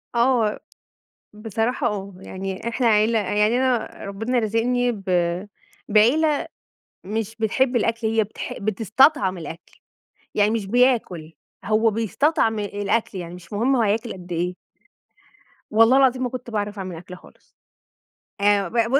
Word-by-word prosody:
آه 235 -3 +2 0.7
بصراحة 225 +4 -1
آه، 200 -2 -4
يعني 190 +2 -6
إحنا 240 0 0
عيلة 220 +1 +3
يعني 210 +4 +1
أنا 255 -2 0
ربنا 225 +6 -1
رازقني 240 +3 +1
ب 205 -4 -8 0.9
بعيلة 280 +9 +3 0.6
مش 220 +2 -4
بتحب 245 +3 +1
الأكل، 230 0 0
هي 220 0 +2
بتح 210 - -7
بتستطعم 215 - +2
الأكل، 165 +1 -10 0.6
يعني 205 0 +3
مش 225 -3 -1
بياكل، 200 -9 +1 0.3
هو 220 +1 +3
بيستطعم 225 - +1
الأكل، 205 +1 -2
يعني 175 -1 -6
مش 180 +2 -13
مهم 240 +6 +2
هو 245 - +2
هياكل 220 +2 0
قد 180 -1 -12
إيه. 175 +2 -1 1.2
والله 225 +4 +5
العظيم 260 -1 +3
ما 250 - -1
كنت 250 -1 -7
باعرف 210 -2 -3
أعمل 185 -3 -5
أكل 180 +2 -10
خالص. - - -20 0.9
آآ 200 -1 +3
ب - - -17
ب 235 +2 +2
220 Hz, 135 wpm, -23 LUFS, 200-240 Hz, 1.2 s, والله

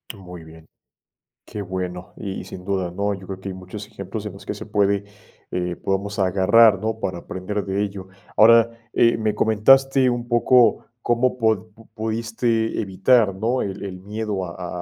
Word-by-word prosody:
Muy 90 -4 -11
bien, 80 0 -15 0.7
qué 105 - -7
bueno. 90 -1 -5
Y 95 -2 -5
sin 90 - -10
duda, 95 -3 -1
¿no? 100 +3 -1
Yo 95 -1 -11
creo 95 0 -7
que 95 +1 -6
hay 95 - -6
muchos 95 +3 -9
ejemplos 105 0 -7
en 100 - -7
los 100 - -13
que - - -3
se 105 - -8
puede, 100 -1 +1 0.5
eh, 90 -1 -2
podamos 100 +3 -3
agarrar, 100 +3 +5
¿no? 110 +2 -3
Para 90 -4 -3
aprender 100 +4 -4
de 95 +1 -1
ello. 100 -2 -6 0.3
Ahora, 115 +1 +7 0.2
eh, 115 -1 +4
me 110 -2 0
comentaste 135 +5 +4
un 120 0 -3
poco 120 -1 +4 0.2
cómo 120 +2 +1
pu 110 -2 +1 0.2
pudiste 115 +1 -1
evitar, 100 +2 +3
¿no? 115 +6 0
El 100 0 -5
el 95 -2 -6
miedo 105 -1 -3
a 90 +1 -6
100 Hz, 170 wpm, -22 LUFS, 95-110 Hz, 0.7 s, Ahora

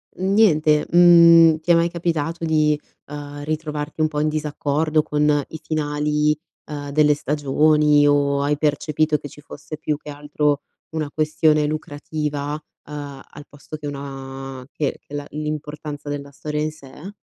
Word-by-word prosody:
niente, 180 -6 +3
mhmm, 170 -2 +7
ti 170 +2 0
è - - +7
mai 170 +1 +3
capitato 165 -1 -2
di, 155 -2 +2 0.3
uhm, 145 0 -8
ritrovarti 150 0 -4
un 155 - +4
po' 150 -1 -3
in 155 +1 +1
disaccordo 155 0 0
con 150 -1 +1
i 160 - -8
finali, 150 -1 0 0.3
uhm, 145 -1 -6
delle 150 0 +4
stagioni 150 +1 +3
o 140 -1 +2
hai 145 +1 0
percepito 150 +1 +1
che 145 - -9
ci 150 - -14
fosse 155 +1 -9
più 150 -1 -2
che 150 - -12
altro, 145 0 -1 0.3
una 155 -2 -3
questione 155 0 +2
lucrativa, 150 -1 -4 0.3
uhm, 145 -2 -7
al 145 0 -12
posto 145 +2 -10
che 150 - -10
una 135 -2 -7
che 145 -3 -2
che - - -15
la 145 0 -4
l'importanza 150 -1 -5
della 140 -1 -5
storia 150 +2 -4
in 155 0 -1
sé? 150 +5 -12
150 Hz, 155 wpm, -21 LUFS, 145-155 Hz, 0.3 s, mhmm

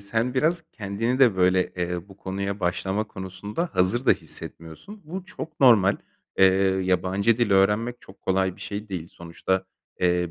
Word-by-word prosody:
sen 115 +5 -1
biraz 160 +5 +1
kendini 115 +4 -2
de, 120 -8 +5
böyle, 90 0 +2
eee, 90 +1 -3
bu 95 - -14
konuya 100 +1 -4
başlama 95 +3 -1
konusunda 100 - -5
hazır 95 +8 +3
da - - +7
hissetmiyorsun. 85 - -6
Bu 180 +4 -6
çok 165 -5 -9
normal. 110 -7 +6 0.4
Eee, 95 - +7 0.4
yabancı 95 +4 +1
dil 120 -4 +1
öğrenmek 105 +5 +2
çok 95 - -16
kolay 95 -1 0
bir - - -18
şey 105 +1 -6
değil. 85 -4 -5
Sonuçta, 85 +3 -3 0.4
eee, 90 -1 +1
100 Hz, 155 wpm, -25 LUFS, 95-115 Hz, 0.4 s, da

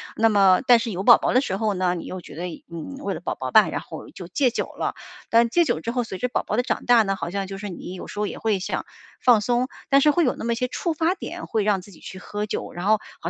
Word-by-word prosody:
那 225 0 +4
么 195 -3 +5
但 245 -2 +7
是 230 0 -3
有 190 0 -3
宝 240 0 +8
宝 - - -1
的 255 - +5
时 190 -8 -2
候 215 0 0
呢， 180 -1 0
你 170 - -6
又 185 - -6
觉 145 - -12
得 175 +3 -4
一 170 - -9
嗯， 170 - -7
为 - - -2
了 - - -5
宝 - - -3
宝 - - -5
吧， - - +6
然 - - -3
后 345 - -10
就 180 - -10
戒 255 +7 +2
酒 240 - -3
了， - - -2 0.3
但 230 +1 +4
戒 340 +7 +3
酒 160 - -1
之 230 - -3
后， 245 0 0
随 190 - -6
着 250 +6 -2
宝 - - -1
宝 - - -2
的 245 - +2
长 - - -2
大 240 -2 +6
呢， 195 -1 -1
好 170 -2 -4
像 195 +2 -3
就 195 0 -6
是 205 +1 -6
你 180 0 -7
有 185 - -8
时 - - -10
候 210 - +1
也 - - -6
会 215 -4 0
想 185 - -3 0.3
放 240 -4 +5
松， 245 +3 +1 0.2
但 275 - +6
是 300 - +5
会 345 +3 +2
有 250 - +1
那 - - -6
么 235 0 +1
些 250 +2 -1
触 335 +6 -2
发 325 +3 +1
点 345 -1 -7
会 220 - 0
让 200 -3 +2
自 200 - -15
己 170 - -16
去 190 - -9
喝 205 +2 -4
酒， 210 - -4
然 175 +1 -5
后 215 +1 +4 0.2
好 170 - -4
215 Hz, 335 characters per minute, -23 LUFS, 190-245 Hz, 0.3 s, 宝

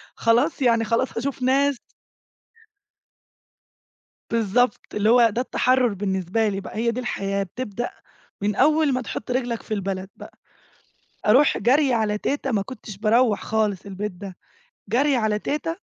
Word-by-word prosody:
خلاص 250 +7 +2
يعني 230 -2 +3
خلاص 230 +3 -1
هاشوف 265 +2 -3
ناس. 270 +1 +2 2.5
بالضبط، 230 +1 +1
اللي 210 +1 +2
هو 240 -1 +6
ده 235 - -2
التحرر 255 -3 +1
بالنسبة 190 +2 -1
لي 195 -1 -2
بقى - - -9
هي 235 +1 +1
دي 245 +2 -3
الحياة، 200 -4 -2
بتبدأ 240 +4 -5 0.5
من 205 0 0
أول 305 +1 +3
ما 255 0 -1
تحط 230 +1 -6
رجلك 245 -2 -1
في 215 - -4
البلد 195 -1 -3
بقى. - - -13 0.9
أروح 260 +7 +5
جري 265 +4 +3
على 215 -2 0
تيتة 275 +2 -2
ما 200 -2 +1
كنتش 210 -3 -9
باروّح 220 +1 +2
خالص 210 -3 -1
البيت 200 +1 -4
ده. 190 0 -9 0.5
جري 275 +4 +2
على 215 -3 0
تيتة 305 +7 -3
230 Hz, 145 wpm, -23 LUFS, 205-255 Hz, 2.5 s, هو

